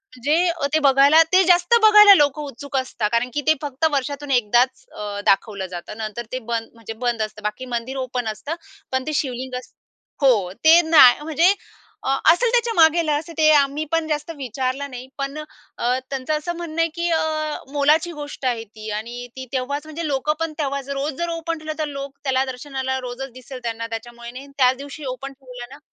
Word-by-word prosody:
म्हणजे 305 +8 +1
अ, 330 -4 -2
ते 315 - +4
बघायला 280 +4 +6
ते 375 - +7
जास्त 350 +5 +4
बघायला 420 -1 +9
लोक 290 -3 +2
उत्सुक 285 -1 -5
असतात. 240 -5 -1
कारण 235 +2 +1
की 295 - -1
ते 315 - +7
फक्त 290 +2 -2
वर्षातून 285 0 -2
एकदाच 245 +1 +2
अ, 205 -1 -5
दाखवलं 195 0 +1
जातं. 175 +5 -8
नंतर 220 +2 -5
ते 255 - -3
बंद 230 -1 -4
म्हणजे 225 -1 -8
बंद 235 -2 0
असतं. 215 0 -5
बाकी 210 +5 -4
मंदिर 255 +3 -4
ओपन 250 -1 -3
असतं, 285 +9 -6 0.4
पण 260 +2 -1
ते 310 - -2
शिवलिंग 255 -1 -5
अस - - -16 0.5
हो, 215 -10 +3
ते 325 +2 +8
नाही 305 -5 +7
म्हणजे 325 +5 +3 0.5
अ, - - -2 0.2
असेल 460 +8 +2
त्याच्या 475 -2 +2
मागेल, 325 0 +4
असं 310 +3 -2
ते 310 -1 +5
आम्ही 285 +1 +2
पण 330 -1 0
जास्त 300 +1 -2
विचारलं 265 +2 -3
नाही. 250 +1 -8
पण 275 +1 -4 0.4
अ, 250 +2 0
त्यांचं 270 +2 -2
असं 345 +3 -4
म्हणणं 330 -1 -3
आहे 330 - +2
की 340 0 -1
अ, 310 -1 -1 0.2
मोलाची 305 +4 +3
गोष्ट 290 -2 -7
आहे 235 -3 0
ती 215 0 -10
आणि 240 +3 -7
ती 260 0 -7
तेव्हाच 280 +3 -2
म्हणजे 310 +1 -5
लोकं 285 +2 0
पण 325 -1 -2
तेव्हाच 280 -1 -3
रोज 280 +2 -2
जर 345 - -1
ओ 335 0 -3
म्हटलं 310 -2 -3
तर 310 - 0
लोक 275 -1 -7
त्याला 265 -1 +1
दर्शनाला 265 0 -4
रोजच 255 +1 -6
दिसेल 255 0 -10
त्यांना, 230 -1 -3
त्याच्यामुळे 235 +1 -8
नाही. 265 +3 -10
त्याच 255 -1 +4
दिवशी 285 +2 -9
ओपन 275 +1 -8
ठेवलं 250 -1 -11
ना - - -16
275 Hz, 195 wpm, -22 LUFS, 245-310 Hz, 0.5 s, बघायला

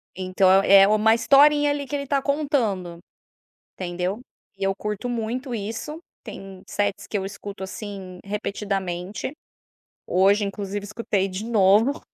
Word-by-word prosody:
Então 185 0 +2
é 195 0 +7
uma 215 +1 +4
historinha 290 +5 +5
ali 285 -1 -3
que 290 - -3
ele 280 0 -3
tá 275 0 +1
contando, 245 - -1 0.7
entendeu? 180 +3 -3 0.4
E 195 - -5
eu 195 0 +1
curto 210 +3 -4
muito 245 +2 -3
isso, 225 +9 -5 0.2
tem 195 -1 -10
sets 205 -1 -2
que 210 - -2
eu 190 - -3
escuto, 195 0 -8
assim, 190 -2 -7
repetidamente, 200 -1 -3 0.8
hoje, 195 +3 +3
inclusive 200 0 -4
escutei 205 -2 -1
de 190 +2 -5
novo 220 +5 +3
205 Hz, 135 wpm, -24 LUFS, 195-235 Hz, 0.8 s, é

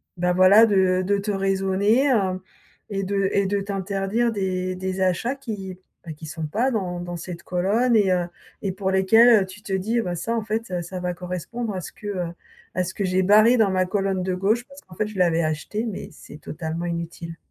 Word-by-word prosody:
bah 180 0 +1
voilà, 185 +5 +7
de 190 -3 +3
de 200 +2 +2
te 200 +1 -2
raisonner, 195 +6 +2
heu 190 -4 0 0.5
et 195 -1 -2
de 195 0 0
et 200 - +2
de 200 +1 0
t'interdire 200 +3 -1
des 185 -3 -2
des 185 +1 -3
achats 185 +8 +1
qui, 205 -8 -6 0.3
bah, 160 - -6
qui 155 +2 -11
sont 160 +1 -5
pas 235 - 0
dans 180 -6 -2
dans 175 0 -5
cette 170 0 -8
colonne 210 +7 +1
et 200 -3 +4
heu, 180 -1 +1 0.3
et 195 - -1
pour 190 0 -2
lesquels, 220 +4 +6
heu, - - -6
tu 190 +2 -12
te 200 - -5
dis: 215 +5 0
«Bah 180 -5 -3
ça 225 +8 -2
en 225 - -1
fait, 220 +2 -3
heu, 180 -1 -1
ça 180 +2 -6
va 180 0 -2
correspondre 180 +6 -5
à 185 - -4
ce - - -8
que, 210 - -10
heu, 180 -4 -3 0.4
à 185 - 0
ce 185 +1 -5
que 200 - -3
j'ai 185 0 +1
barré 215 +5 +6
dans 215 -4 +3
ma 185 0 +2
colonne 195 -1 -1
de 185 0 -1
gauche 205 +6 +1
parce 280 +1 -14
qu'en 180 - -16
fait 215 +3 -1
je 210 -2 -9
l'avais 170 -2 +3
acheté, 155 +8 -2
mais 215 -5 -5
c'est 150 -1 -13
totalement 160 +2 -5
inutile». 170 0 -5
190 Hz, 225 wpm, -23 LUFS, 180-210 Hz, 0.5 s, voilà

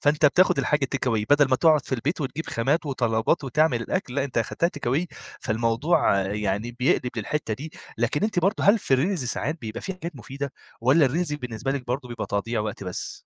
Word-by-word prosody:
فأنت 150 +1 +4
بتاخد 175 +1 +4
الحاجة 135 0 +1
takeaway 115 -5 0
بدل 145 -1 +5
ما 130 - +3
تقعد 155 -2 +4
في - - -1
البيت 145 +7 -2
وتجيب 145 +4 -3
خامات 145 +8 0
وطلبات 125 +2 +1
وتعمل 135 -1 +2
الأكل. 135 -1 -3
لأ، 140 - +1
أنت 130 -4 -2
أخدتها 170 +9 0
takeaway، 140 +6 0 0.4
فالموضوع 115 - +2
يعني 105 +3 -2
بيقلب 125 -1 +2
للحتة 115 +1 -2
دي. 150 +7 -8 0.3
لكن 120 +7 0
أنتِ 215 -3 0
برضه، 195 +5 +1
هل 210 +3 +6
في 135 - +2
الreels 180 +8 0
ساعات 145 +6 -2
بيبقى 110 -1 -6
في 190 - -4
حاجات 170 -4 -7
مفيدة، 135 +2 -6 0.3
والّا 135 +5 +5
الreels 160 +3 -1
بالنسبة 125 0 -4
لِك 135 -3 -4
برضه 125 +1 -3
بيبقى 120 -2 -4
تضييع 110 +3 -1
وقت 105 -2 -4
بس؟ 90 -1 -5
135 Hz, 195 wpm, -25 LUFS, 115-155 Hz, 0.4 s, هل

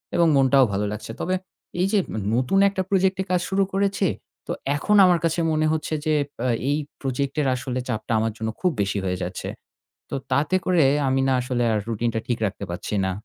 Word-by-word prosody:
এবং 170 -1 +4
মনটাও 135 0 +5
ভালো 105 +1 0
লাগছে।" 105 +1 -6
তবে 185 +1 0 0.4
এই 185 - +3
যে 210 - +4
ন্য - - -9 0.2
নতুন 130 +10 +2
একটা 195 -1 -2
প্রজেক্টে 190 0 +2
কাজ 180 - +2
শুরু 195 0 +2
করেছি, 195 0 +1 0.4
তো - - -3 0.2
এখন 210 +8 +1
আমার 175 -2 +4
কাছে 165 +1 0
মনে 155 0 +1
হচ্ছে 160 0 -2
যে 155 - +2
এব 140 - -14 0.4
এই 145 - +2 0.2
প্রজেক্টের 140 +2 -1
আসলে 130 0 -3
চাপটা 115 -1 -2
আমার 110 0 0
জন্য 110 0 -2
খুব 180 - +3
বেশি 100 +1 -1
হয়ে 90 0 -1
যাচ্ছে। 90 +1 -5 0.6
তো - - -3 0.2
তাতে 150 +6 +2
করে 180 -4 +4 0.2
আমি 135 0 +2
না 135 - +3
আসলে 125 -1 -1
আর 105 - +1
রুটিনটা 115 0 -1
ঠিক 120 - 0
রাখতে 100 0 -4
পারছি 85 +4 -4
না। 95 - 0
140 Hz, 200 wpm, -24 LUFS, 115-180 Hz, 0.6 s, মনটাও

